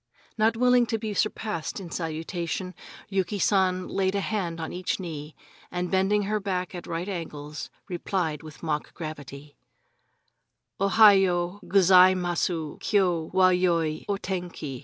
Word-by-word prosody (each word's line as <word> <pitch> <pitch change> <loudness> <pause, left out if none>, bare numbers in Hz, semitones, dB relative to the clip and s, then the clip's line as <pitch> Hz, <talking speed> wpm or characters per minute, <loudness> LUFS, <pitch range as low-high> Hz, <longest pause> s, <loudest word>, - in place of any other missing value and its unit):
Not 225 +1 +2
willing 250 0 +4
to 225 - 0
be 215 -1 -4
surpassed 210 -4 -2
in 180 -4 -9
salutation, 170 +2 -4 0.3
Yuki 195 0 -1
San 185 -1 +2
laid 190 0 0
a - - +1
hand 185 -5 -2
on 160 - -5
each 180 +2 -2
knee, 155 -4 -7 0.3
and 180 0 -3
bending 195 +2 +2
her 210 +2 -1
back 185 -3 -3
at 175 -2 -7
right 165 +3 -3
angles, 150 -5 -6 0.2
replied 175 -4 -2
with 155 0 -12
mock 150 -2 -3
gravity: 145 -3 -8 1.2
"Ohayo 195 -3 +4
Gozaimasu 180 -4 +3
Kyo 180 -6 +1
wa 185 -1 +5
yoi 170 -4 +1
O 200 - +1
tenki." 175 -9 -5
180 Hz, 135 wpm, -26 LUFS, 165-195 Hz, 1.2 s, wa